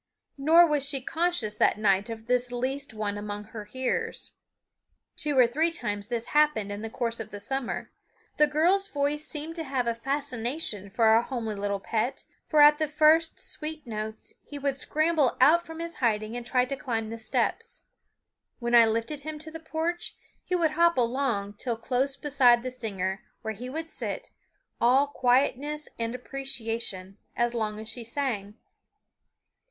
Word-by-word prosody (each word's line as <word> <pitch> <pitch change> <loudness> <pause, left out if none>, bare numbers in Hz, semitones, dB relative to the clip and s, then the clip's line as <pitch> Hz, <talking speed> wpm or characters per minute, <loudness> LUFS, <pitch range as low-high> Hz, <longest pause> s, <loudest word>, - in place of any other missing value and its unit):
Nor 325 +5 +7
was 300 -4 +1
she 280 0 0
conscious 315 -6 0
that 210 - +3
night 200 0 +2
of 225 -1 -7
this 245 0 +1
least 265 +3 -2
one 210 -1 -3
among 205 0 -5
her 210 0 -9
hearers. 260 +5 -3 0.8
Two 295 -3 0
or 250 - +8
three 305 +8 +2
times 205 -10 -3
this 235 0 -3
happened 295 -9 +3
in 205 +1 -5
the 225 - -4
course 230 0 -2
of 220 -1 -6
the 205 - -8
summer. 265 +4 -3 0.5
The 300 - +6
girl's 350 +7 +3
voice 295 -3 -1
seemed 310 +2 -4
to 325 - -2
have 265 -4 -1
a 235 - +1
fascination 250 - -3
for 225 +4 +1
our 220 +1 +6
homely 235 -3 -4
little 200 0 -2
pet, 225 +5 -2 0.2
for 305 -2 +4
at 295 +1 +8
the 310 - +1
first 310 +2 +4
sweet 305 -1 -5
notes 220 -1 -6
he 290 - -9
would 280 -1 -1
scramble 310 0 +1
out 330 +7 +5
from 325 0 -8
his 335 0 -5
hiding 220 -3 0
and 245 - -4
try 250 +2 +2
to 275 - -3
climb 225 -4 -3
the 230 - -6
steps. 220 - -1 0.7
When 240 -1 -3
I 235 -1 +8
lifted 230 +7 -1
him 310 +1 -5
to 315 +1 -8
the 325 - -7
porch 320 +2 -3 0.3
he 365 - -1
would 330 -3 +2
hop 340 0 +3
along 235 -5 0
till 235 -3 -2
close 265 +4 0
beside 255 -5 +4
the 255 - -3
singer, 195 -6 -3 0.2
where 220 0 -3
he 245 +5 -7
would 320 +3 -5
sit, - - -5 0.5
all 255 +4 +5
quietness 280 +3 +1
and 230 +1 -2
appreciation, 230 -7 -3 0.2
as 240 0 +1
long 215 -2 -2
as 220 - -8
she 230 +2 -6
sang. 225 -5 -3
250 Hz, 175 wpm, -27 LUFS, 225-300 Hz, 0.8 s, or